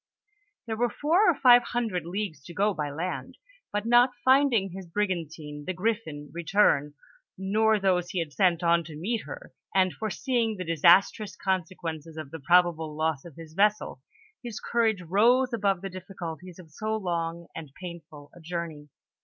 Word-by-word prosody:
There 220 Hz, -2 st, -4 dB
were 240 Hz, +1 st, +1 dB
four 340 Hz, -, +3 dB
or 340 Hz, -, +3 dB
five 245 Hz, -3 st, +7 dB
hundred 225 Hz, -8 st, -2 dB
leagues 180 Hz, -6 st, -4 dB
to 170 Hz, -, -10 dB
go 205 Hz, +3 st, +2 dB
by 150 Hz, -4 st, -3 dB
land, 165 Hz, +6 st, -5 dB, 0.3 s
but 205 Hz, +1 st, -2 dB
not 240 Hz, +2 st, +5 dB
finding 260 Hz, -7 st, +4 dB
his 190 Hz, 0 st, -8 dB
brigantine, 165 Hz, -6 st, -3 dB
the 185 Hz, -, -3 dB
Griffin, 180 Hz, -8 st, -3 dB
return, 165 Hz, -4 st, +2 dB, 0.4 s
nor 215 Hz, +3 st, +2 dB
those 180 Hz, -3 st, +1 dB
he 185 Hz, -, -5 dB
had 165 Hz, -3 st, -1 dB
6,:nt 180 Hz, -3 st, +2 dB
on 170 Hz, 0 st, +3 dB
to 155 Hz, -1 st, -9 dB
'meet 205 Hz, +8 st, -3 dB
her, -, -, -9 dB, 0.2 s
and 185 Hz, -1 st, +3 dB
foreseeing 225 Hz, 0 st, -1 dB
the 185 Hz, -, -5 dB
disastrous 170 Hz, +6 st, +4 dB
consequences 165 Hz, -4 st, -3 dB
of 155 Hz, -3 st, -7 dB
the 160 Hz, -, -7 dB
probable 160 Hz, 0 st, +2 dB
loss 155 Hz, -2 st, -1 dB
of 170 Hz, -, -12 dB
his 160 Hz, -1 st, -11 dB
vessel, 210 Hz, +4 st, +1 dB, 0.4 s
his 240 Hz, -3 st, -6 dB
courage 225 Hz, -5 st, 0 dB
rose 235 Hz, +8 st, +3 dB
above 200 Hz, -5 st, +1 dB
the 195 Hz, -, -4 dB
difficul 185 Hz, -3 st, -7 dB
ties 180 Hz, -2 st, -11 dB
of 170 Hz, -4 st, -14 dB
so 215 Hz, +7 st, -2 dB
long 170 Hz, -3 st, -3 dB
and 155 Hz, -4 st, -8 dB
painful 165 Hz, -5 st, -10 dB
a -, -, -14 dB
journey. 160 Hz, -3 st, -6 dB
185 Hz, 170 wpm, -27 LUFS, 165-215 Hz, 0.4 s, five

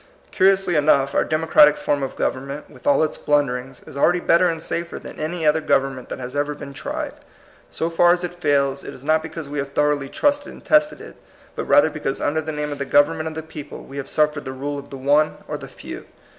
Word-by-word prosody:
Curiously 190 Hz, -2 st, +3 dB
enough, 140 Hz, -2 st, +3 dB
our -, -, +3 dB
democratic 155 Hz, -1 st, +4 dB
form 145 Hz, -1 st, -1 dB
of 135 Hz, -, -4 dB
government, 140 Hz, +3 st, -3 dB
with -, -, -11 dB
all 285 Hz, -, +4 dB
its 155 Hz, -, -2 dB
blunderings, 135 Hz, -3 st, -1 dB
is -, -, -12 dB
already 175 Hz, +5 st, +3 dB
better 175 Hz, +1 st, +4 dB
and 165 Hz, -1 st, -2 dB
safer 170 Hz, +1 st, -4 dB
than -, -, -10 dB
any 160 Hz, +1 st, -3 dB
other 155 Hz, +1 st, +3 dB
government 135 Hz, -4 st, 0 dB
that -, -, -5 dB
has 125 Hz, +1 st, -7 dB
ever 145 Hz, +1 st, -1 dB
been 140 Hz, -1 st, -9 dB
tried. -, -, -4 dB, 0.6 s
Scf 165 Hz, +1 st, -2 dB
far 175 Hz, +1 st, +5 dB
as 175 Hz, 0 st, +1 dB
it 175 Hz, 0 st, -3 dB
fails, 140 Hz, -5 st, +1 dB
it -, -, -8 dB
is 130 Hz, -, -14 dB
not 155 Hz, +1 st, +3 dB
because 160 Hz, -1 st, -7 dB
we 145 Hz, +1 st, -4 dB
have 140 Hz, 0 st, -4 dB
thoroughly 145 Hz, -2 st, +1 dB
trusted 290 Hz, -, 0 dB
and -, -, -15 dB
tested 300 Hz, 0 st, +3 dB
it, -, -, -12 dB, 0.4 s
but -, -, -3 dB
rather 290 Hz, -, +5 dB
because 145 Hz, -3 st, -3 dB
under 155 Hz, +2 st, 0 dB
the 155 Hz, 0 st, -5 dB
name 150 Hz, -1 st, -3 dB
of 145 Hz, -, -5 dB
the 140 Hz, -, -2 dB
government 145 Hz, +3 st, +3 dB
of 160 Hz, -, -5 dB
the 160 Hz, -, -5 dB
people 150 Hz, -2 st, -9 dB
we 140 Hz, -, -10 dB
have 140 Hz, -1 st, -5 dB
suffered 150 Hz, -1 st, +1 dB
the 130 Hz, -, -6 dB
rule 140 Hz, +2 st, -4 dB
of 140 Hz, -, -12 dB
the 135 Hz, -, -7 dB
one 145 Hz, +3 st, +2 dB
or -, -, -4 dB
the -, -, -7 dB
few. -, -, -10 dB
150 Hz, 235 wpm, -22 LUFS, 140-160 Hz, 0.6 s, far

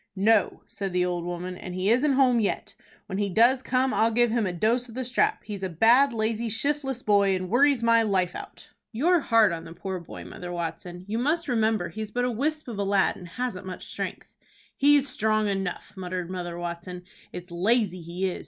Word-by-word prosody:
"No," 205 Hz, +1 st, +2 dB
said 195 Hz, -2 st, -5 dB
the 180 Hz, 0 st, +2 dB
old 175 Hz, -1 st, -2 dB
woman, 175 Hz, +1 st, -5 dB
"and 180 Hz, 0 st, -7 dB
he 185 Hz, +3 st, +1 dB
isn't 275 Hz, +4 st, +3 dB
home 255 Hz, -3 st, +4 dB
yet. 210 Hz, -, -2 dB, 0.3 s
When 195 Hz, 0 st, -4 dB
he 205 Hz, -1 st, 0 dB
does 240 Hz, +7 st, +4 dB
come 260 Hz, 0 st, +1 dB
I'll 225 Hz, -, +3 dB
give 240 Hz, 0 st, +2 dB
him 225 Hz, -3 st, +1 dB
a -, -, -1 dB
dose 230 Hz, +8 st, 0 dB
of 230 Hz, -, -11 dB
the 260 Hz, 0 st, -3 dB
strap. 250 Hz, +2 st, +1 dB
He's 205 Hz, -2 st, -6 dB
a 190 Hz, -, -2 dB
bad, 235 Hz, -, +5 dB
lazy, 225 Hz, 0 st, -1 dB
shiftless 270 Hz, +2 st, -1 dB
boy, 200 Hz, -2 st, +3 dB
and 185 Hz, 0 st, -4 dB
worries 270 Hz, 0 st, +4 dB
my 230 Hz, 0 st, +5 dB
life 190 Hz, -5 st, +1 dB
out." -, -, -10 dB, 0.2 s
"You're 335 Hz, +10 st, +3 dB
hard 225 Hz, -, +4 dB
on 165 Hz, -1 st, -4 dB
the 165 Hz, 0 st, -10 dB
poor 185 Hz, +2 st, -5 dB
boy, 170 Hz, -, -10 dB
Mother 180 Hz, 0 st, -8 dB
Watson. 175 Hz, +1 st, -5 dB
You 220 Hz, +3 st, -2 dB
must 320 Hz, +7 st, 0 dB
remember 220 Hz, -6 st, +1 dB
he's 215 Hz, +4 st, -6 dB
but 245 Hz, +3 st, -1 dB
a 250 Hz, -, 0 dB
wisp 305 Hz, +6 st, -2 dB
of 225 Hz, -4 st, -6 dB
a -, -, +1 dB
lad, 195 Hz, 0 st, +2 dB
and 180 Hz, -, -10 dB
hasn't 190 Hz, -1 st, -4 dB
much 185 Hz, -, -7 dB
strength." -, -, -6 dB, 0.4 s
"He's 285 Hz, 0 st, +4 dB
strong 215 Hz, -3 st, +1 dB
enough," 195 Hz, -3 st, -3 dB
muttered 180 Hz, -1 st, -5 dB
Mother 175 Hz, -2 st, -5 dB
Watson. 175 Hz, +1 st, -6 dB, 0.3 s
"It's 180 Hz, 0 st, -9 dB
lazy 185 Hz, 0 st, +1 dB
he 175 Hz, +3 st, -3 dB
is. 180 Hz, -, -4 dB
210 Hz, 210 wpm, -26 LUFS, 180-240 Hz, 0.4 s, bad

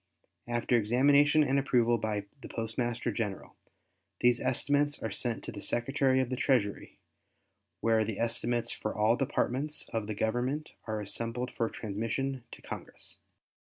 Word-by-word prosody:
After 120 Hz, +1 st, +1 dB
examination 140 Hz, +7 st, +5 dB
and 140 Hz, 0 st, +2 dB
approval 120 Hz, -3 st, +3 dB
by 105 Hz, -2 st, -2 dB, 0.2 s
the -, -, -7 dB
Postmaster 120 Hz, +1 st, -2 dB
General, 105 Hz, -2 st, -4 dB, 0.7 s
these 120 Hz, -1 st, +4 dB
estimates 145 Hz, +3 st, +2 dB
are 110 Hz, -, -2 dB
sent 115 Hz, +2 st, -2 dB
to -, -, -5 dB
the 100 Hz, -, -7 dB
Secretary 130 Hz, +2 st, +2 dB
of 130 Hz, -1 st, 0 dB
the -, -, +1 dB
Treasury 120 Hz, -6 st, 0 dB, 0.8 s
where 115 Hz, -1 st, +3 dB
the 110 Hz, -1 st, -3 dB
estimates 120 Hz, +1 st, 0 dB
for 110 Hz, -, -3 dB
all 110 Hz, +2 st, +4 dB
Departments 135 Hz, +2 st, -1 dB
of 110 Hz, -2 st, -2 dB
the 110 Hz, -, -3 dB
Government 125 Hz, +8 st, -1 dB, 0.2 s
are 110 Hz, -1 st, -2 dB
assembled 115 Hz, +4 st, -2 dB
for 115 Hz, -1 st, -1 dB
transmission 115 Hz, +5 st, -3 dB
to -, -, -11 dB
Congress. -, -, -7 dB
120 Hz, 145 wpm, -31 LUFS, 110-130 Hz, 0.8 s, examination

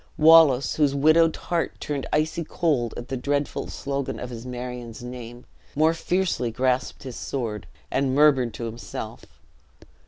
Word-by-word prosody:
Wallace, 155 Hz, -4 st, +6 dB
whose 145 Hz, -3 st, +3 dB
widowed 155 Hz, +3 st, +4 dB
heart 170 Hz, -1 st, -2 dB
turned 145 Hz, -2 st, -3 dB
icy 155 Hz, +2 st, 0 dB
cold 145 Hz, -8 st, 0 dB
at 120 Hz, -, -7 dB
the 135 Hz, -, -2 dB
dreadful 140 Hz, +3 st, -2 dB
slogan 140 Hz, -1 st, -4 dB
of 125 Hz, -, -6 dB
his 120 Hz, +1 st, -8 dB
Marion's 125 Hz, -2 st, -6 dB
name, 120 Hz, -1 st, -8 dB, 0.3 s
more 155 Hz, +2 st, +4 dB
fiercely 170 Hz, -7 st, 0 dB
grasped 125 Hz, +2 st, -1 dB
his 130 Hz, -3 st, -7 dB
sword, 115 Hz, -6 st, -4 dB, 0.2 s
and 135 Hz, -1 st, +1 dB
murmured 135 Hz, -5 st, +4 dB
to 120 Hz, -, -6 dB
himself. 115 Hz, +1 st, -7 dB
135 Hz, 145 wpm, -25 LUFS, 125-150 Hz, 0.3 s, Wallace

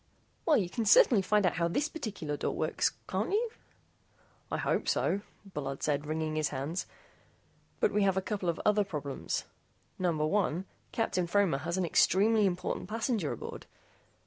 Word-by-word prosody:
"Well, 310 Hz, -, +6 dB
you 190 Hz, -, +1 dB, 0.2 s
certainly 215 Hz, 0 st, +6 dB
can 185 Hz, -, -11 dB
find 210 Hz, -2 st, +4 dB
out 180 Hz, -, +1 dB
how 170 Hz, 0 st, +2 dB
this 280 Hz, -, 0 dB
particular 205 Hz, -, -4 dB
door -, -, -2 dB
works, -, -, 0 dB
can't -, -, -1 dB
you?" 445 Hz, +3 st, +1 dB, 1.0 s
"I -, -, 0 dB
hope -, -, 0 dB
so," 200 Hz, -, +1 dB, 0.3 s
Bullard 140 Hz, -2 st, -4 dB
said, 150 Hz, 0 st, 0 dB
wringing 155 Hz, 0 st, -2 dB
his 155 Hz, -1 st, +1 dB
hands. 145 Hz, +6 st, -3 dB, 0.9 s
"But 450 Hz, -, +3 dB
we 210 Hz, -, +2 dB
have 195 Hz, -1 st, +3 dB
a -, -, +5 dB
couple 195 Hz, -3 st, -2 dB
of 165 Hz, -, -1 dB
other 210 Hz, 0 st, +4 dB
problems. 145 Hz, -7 st, -3 dB, 0.6 s
Number 165 Hz, -4 st, +1 dB
one, 185 Hz, 0 st, +1 dB, 0.3 s
Captain 185 Hz, -6 st, 0 dB
Fromer 180 Hz, -6 st, +2 dB
has 170 Hz, +4 st, -2 dB
an 185 Hz, -, +1 dB
extremely 205 Hz, +5 st, +4 dB
important 180 Hz, -1 st, -3 dB
passenger 220 Hz, -, -1 dB
aboard. -, -, -7 dB
185 Hz, 165 wpm, -31 LUFS, 155-210 Hz, 1.0 s, Well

